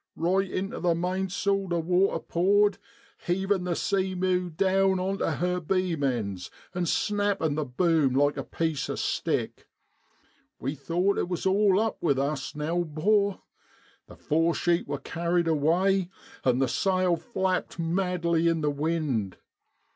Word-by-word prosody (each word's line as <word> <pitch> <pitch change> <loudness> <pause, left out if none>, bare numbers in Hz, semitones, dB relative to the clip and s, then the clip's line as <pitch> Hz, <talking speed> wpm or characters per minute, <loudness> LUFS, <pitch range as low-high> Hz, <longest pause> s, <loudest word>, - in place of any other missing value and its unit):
Eight 185 +3 +1
intu 195 +1 -3
the 175 -2 +2
mainsail 190 +2 -1
the 175 -1 0
water 180 +4 +2
poured, 205 +4 +2 0.4
heavin' 190 +1 0
the 175 -1 -1
Sea 190 -2 0
meiu 180 -1 0
down 190 +2 +2
on 195 +2 -2
tu - - 0
her 180 0 0
beam 180 -2 -1
ends, 105 -9 -2 0.2
and 175 -2 -1
snappin' 205 -6 0
the 155 0 -2
boom 145 0 +2
like 145 +1 +3
a 135 - -3
piece 160 0 -2
o' - - -2
stick. - - -2 0.9
We 135 +3 -2
thought 175 +7 0
it - - -2
wor 180 - -1
all 195 0 +4
up 220 0 -1
with 140 -5 +2
us 140 +1 -2
now, 160 +4 -1
'bor. 200 +6 +1 0.6
The - - -13
fore 165 +2 +1
sheet 175 0 +1
wor - - -2
carried 170 0 -1
away, 175 +5 +2 0.3
an' 125 -1 +3
the 135 0 +2
sail 185 +4 +1
flapped 190 -3 -2
madly 170 -1 0
in 165 -1 +1
the 150 -1 +1
wind. 145 - -1
175 Hz, 150 wpm, -27 LUFS, 155-190 Hz, 0.9 s, all